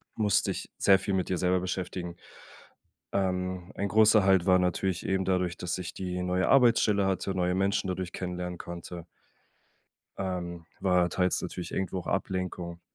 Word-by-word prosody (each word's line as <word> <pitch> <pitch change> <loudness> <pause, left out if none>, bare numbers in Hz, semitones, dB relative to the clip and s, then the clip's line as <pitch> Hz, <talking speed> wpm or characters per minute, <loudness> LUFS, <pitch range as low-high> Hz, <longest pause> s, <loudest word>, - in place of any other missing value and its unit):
musst 105 -3 +2
dich - - -4
sehr 95 -1 +5
viel 100 - -2
mit 95 -1 0
dir 90 - 0
selber 90 +2 +2
beschäftigen. 90 -1 -4 1.0
Ähm, 90 -1 -1
ein 100 - -1
großer 110 0 +5
Halt 95 -3 +4
war 95 -1 +5
natürlich 90 0 -1
eben 95 0 +1
dadurch, 90 -2 0
dass 90 0 -2
ich 90 -2 -6
die 90 -1 -4
neue 90 +1 0
Arbeitsstelle 115 -6 +4
hatte, 95 0 -1
neue 90 0 +1
Menschen 95 0 +1
dadurch 90 -1 -3
kennenlernen 90 -1 -4
konnte 85 0 -8 1.1
ähm, 85 -3 -4
war 90 -2 +3
teils 90 +1 +1
natürlich 90 - -6
irgendwo 95 0 -2
auch - - -7
Ablenkung. 90 -2 -3
90 Hz, 160 wpm, -28 LUFS, 90-95 Hz, 1.1 s, sehr